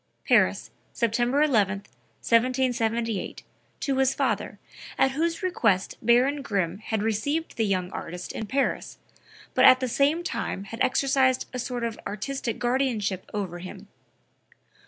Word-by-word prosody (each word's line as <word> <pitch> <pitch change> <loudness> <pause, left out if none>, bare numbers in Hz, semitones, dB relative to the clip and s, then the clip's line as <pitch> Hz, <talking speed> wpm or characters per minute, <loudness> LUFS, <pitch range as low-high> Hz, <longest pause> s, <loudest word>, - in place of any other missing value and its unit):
(Paris, - - +3 0.2
September 240 +5 +1
11, 205 -8 +2 0.4
1778, 235 -3 0 0.4
to 275 -3 -1
his 265 0 +3
father, - - -1 0.4
at 270 - +3
whose 330 +5 -1
request 225 - +1
Baron 255 +5 +3
Grimm 195 -7 -1
had 220 -1 -2
received 285 +10 -1
the 225 -2 +1
young 185 -2 -1
artist 180 +1 -6
in 220 - -5
Paris, 270 +4 -1 0.6
but - - +3
at 255 - +8
the 260 - -1
same 285 +7 +2
time 195 - -3
had 230 +4 -8
exercised 260 -1 +2
a 250 - -3
sort 245 -1 -3
of 230 -1 -3
artistic 230 +3 -3
guardianship 240 -6 -1
over 190 -4 -4
him. 190 +3 -10
235 Hz, 135 wpm, -26 LUFS, 205-265 Hz, 0.6 s, at